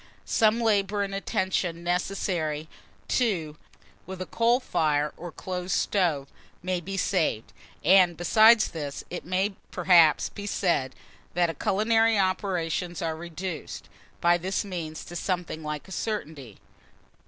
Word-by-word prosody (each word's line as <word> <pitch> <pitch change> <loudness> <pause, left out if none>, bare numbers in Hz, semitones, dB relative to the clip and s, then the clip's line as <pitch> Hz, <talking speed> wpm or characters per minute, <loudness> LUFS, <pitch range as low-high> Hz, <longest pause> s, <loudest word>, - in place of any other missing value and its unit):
Some 220 +1 +3
labour 205 -3 +1
and 195 0 -4
attention 185 -3 -1
necessary, 175 -4 -1 0.4
too, 175 -12 0 0.5
with 190 0 -7
a 185 - -3
coal 235 +5 +2
fire 150 - 0
or 175 -1 -8
close 180 +1 -5
stove, 160 -6 +1 0.4
may 180 -1 -1
be 195 +3 -5
saved; 160 - 0 0.3
and, 180 -3 +5
besides 220 +5 +5
this, 145 -4 -6
it 180 - -5
may, 190 +3 0 0.2
perhaps, 170 -4 +4
be 205 -1 -8
said 165 -10 0 0.4
that 170 -3 +1
culinary 225 +2 +3
operations 180 -3 -1
are 160 -1 -1
reduced, 170 +1 -6 0.3
by 175 0 +4
this 190 +4 -2
means, 165 -5 -6
to 175 - -9
something 175 -3 -3
like 150 -1 -5
a - - -13
certainty. 155 - -5
180 Hz, 130 wpm, -27 LUFS, 160-195 Hz, 0.5 s, and